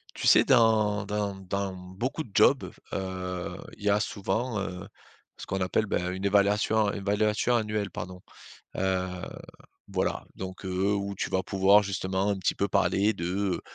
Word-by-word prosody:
Tu - - -2
sais - - +7
dans 110 -2 +3
dans 105 -1 -2
dans 95 +1 -3
beaucoup 95 - -4
de 110 - -17
jobs, - - +4 0.2
heu, 90 -1 -4 0.2
il - - -14
y 105 - +2
a 100 +1 +3
souvent, 105 +3 -2
heu, 95 -1 -5 0.5
ce - - -8
qu'on 95 0 -2
appelle 95 +4 +1
bah, 100 - 0
une 95 +2 -4
évaluation- 105 +1 +3
évaluation 105 +4 +1
annuelle 105 -3 -1
pardon, 90 +1 -7 0.6
heu, 95 -1 0 0.8
voilà. - - -1
Donc 95 +1 -7
heu, 95 +2 0
où 100 0 -3
tu - - -2
vas 95 - 0
pouvoir 100 +2 +4
justement 95 0 -1
un 100 -1 0
petit 95 - 0
peu 100 - 0
parler 95 +5 +2
de, 85 - -5 0.3
heu, - - -7
100 Hz, 165 wpm, -28 LUFS, 95-105 Hz, 0.8 s, sais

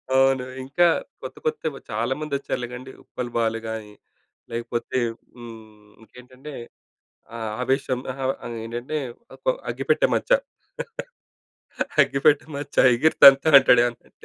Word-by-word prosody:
అవును. 135 -1 +3 0.2
ఇంకా 145 +7 +3 0.3
కొత్త, - - -8
కొత్తవి 300 - -2
చాలామంది 130 +7 -2
వచ్చారులే 125 -3 -4
గండి. 130 +2 -9
ఉప్పల్ 120 -1 -6
బాలు 115 -1 0
గానీ, 110 -2 -6 0.6
లేకపోతే 120 +2 -3 0.4
హ్మ్, 110 -3 -13 0.2
ఇంకేంటంటే 130 +5 -13 0.8
ఆ! - - -5 0.3
ఆవేశం 130 -1 0
అహా! 135 +1 -6 0.2
అని 120 - -6
ఏంటంటే, 120 +6 -5 0.4
ఒక్క - - -20 0.2
అగ్గిపెట్టే - - +1
మచ్చ. - - -5 1.7
అగ్గిపెట్ట 140 +1 +2 0.2
మచ్చ 145 0 -8 0.2
ఎగిరి‌తంతనంటాడు 135 -2 +7
ఏమన్నఅంటే. 120 -1 -6
130 Hz, 105 wpm, -23 LUFS, 115-140 Hz, 1.7 s, ఎగిరి‌తంతనంటాడు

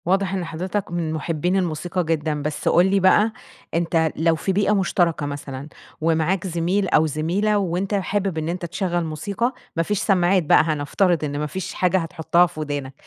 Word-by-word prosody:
واضح 190 +2 +1
إن 185 -2 -2
حضرتك 185 +4 -4
من 170 -2 -2
محبين 165 +3 -1
الموسيقى 175 0 -1
جدًا. 155 -2 -1
بس 150 +1 -4
قُل 175 - +5
لي 195 +1 +2
بقى 210 +4 +4 0.4
أنت 165 -1 +1
لو 165 +1 +2
في 190 - -2
بيئة 205 +2 +2
مُشتركة 175 -6 +1
مثلًا، 140 -1 -6 0.3
ومعاك 165 +4 +1
زميل 180 +3 0
أو 155 - +4
زميلة، 175 +8 0
وأنت 190 +1 -1
حابب 195 -2 -1
إن 160 +1 -2
أنت 175 0 -3
تشغل 175 0 -2
موسيقى، 200 - -2 0.2
ما 165 - +1
فيش 210 +3 -1
سمّاعات 185 -2 +3
بقى 155 - +5
هنفترض 155 +3 +1
إن 145 -1 -2
ما 150 - -1
فيش 185 +4 -5
حاجة 185 +1 +2
هتحُطها 170 0 +2
في 175 -2 -8
وِدانك، 145 -3 -4
170 Hz, 180 wpm, -22 LUFS, 155-190 Hz, 0.4 s, قُل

